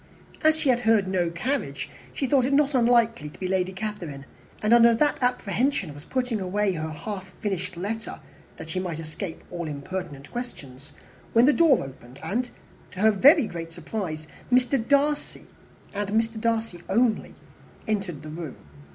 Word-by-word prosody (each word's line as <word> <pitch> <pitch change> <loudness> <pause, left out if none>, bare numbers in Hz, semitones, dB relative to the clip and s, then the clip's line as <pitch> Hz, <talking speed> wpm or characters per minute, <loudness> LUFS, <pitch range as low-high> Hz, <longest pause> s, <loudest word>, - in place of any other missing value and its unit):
As 315 0 +5
she 305 -3 0
had 245 -2 +4
heard 225 -4 +3
no 180 -2 +1
carriage, 255 +12 -2 0.2
she 275 - -2
thought 270 -1 +3
it 275 - 0
not 290 0 +3
unlikely 235 - +3
to - - -15
be 185 - -2
Lady 185 0 +1
Catherine; 185 -9 -5 0.3
and 215 +2 +3
under 235 -1 +7
that 290 +4 +2
apprehension 245 - 0
was 145 +2 -12
putting 250 -5 -1
away 195 +2 +1
her 160 -2 -3
half 190 +4 -6
finished 185 -5 -3
letter, 220 +5 -4 0.4
that 160 - -7
she 185 - -1
might 175 -4 -3
escape 165 +2 -6
all 175 -2 -4
impertinent 145 -1 -6
questions, 145 - -8 0.4
when 230 +2 +6
the 295 - +6
door 320 -5 +5
opened, 130 -1 -12
and 245 +4 -1 0.4
to 185 - -7
her 220 +1 +6
very 280 - +6
great 165 -4 -6
surprise 165 -2 -5 0.3
Mr. 250 0 +3
Darcy, 290 +1 +1 0.5
and 205 0 -2
Mr. 225 +1 0
Darcy 225 -6 -1
only, 225 +2 +1 0.5
entered 195 -8 -2
the 155 - -7
room. 160 -2 -6
210 Hz, 165 wpm, -26 LUFS, 170-245 Hz, 0.5 s, under